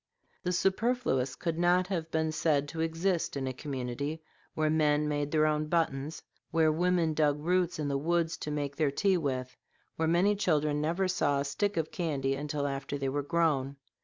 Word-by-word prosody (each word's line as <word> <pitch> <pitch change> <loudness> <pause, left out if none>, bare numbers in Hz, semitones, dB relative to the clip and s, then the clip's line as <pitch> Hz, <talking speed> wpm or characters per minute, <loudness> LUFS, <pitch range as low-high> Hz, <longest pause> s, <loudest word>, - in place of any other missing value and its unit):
The 180 - -1
superfluous 190 - +1
could 165 -1 -3
not 175 +1 +4
have 165 -4 -2
been 160 -1 0
said 155 -2 +1
to 160 +1 -4
exist 165 0 0
in 135 - -2
a 130 - -2
community 140 +3 -4 0.3
where 155 0 +1
men 150 -1 +2
made 145 -1 -1
their 155 0 +3
own 155 0 +1
buttons, 155 -2 -1 0.3
where 160 -1 +3
women 170 0 +2
dug 150 -2 +2
roots 175 +2 +1
in 150 -2 -2
the 140 -1 0
woods 165 +2 +1
to - - -5
make 145 -1 -3
their 155 -2 +2
tea 190 +6 +2
with, 130 -5 -3 0.4
where 160 - +1
many 180 +5 +3
children 150 -6 +1
never 170 +5 0
saw 145 -6 +1
a 140 - -1
stick 200 +7 -1
of 160 -1 -1
candy 140 -6 -1
until 145 +1 -2
after 140 0 -3
they 135 -1 -1
were 145 +2 -1
grown. 140 -3 +1
155 Hz, 190 wpm, -30 LUFS, 145-170 Hz, 0.4 s, not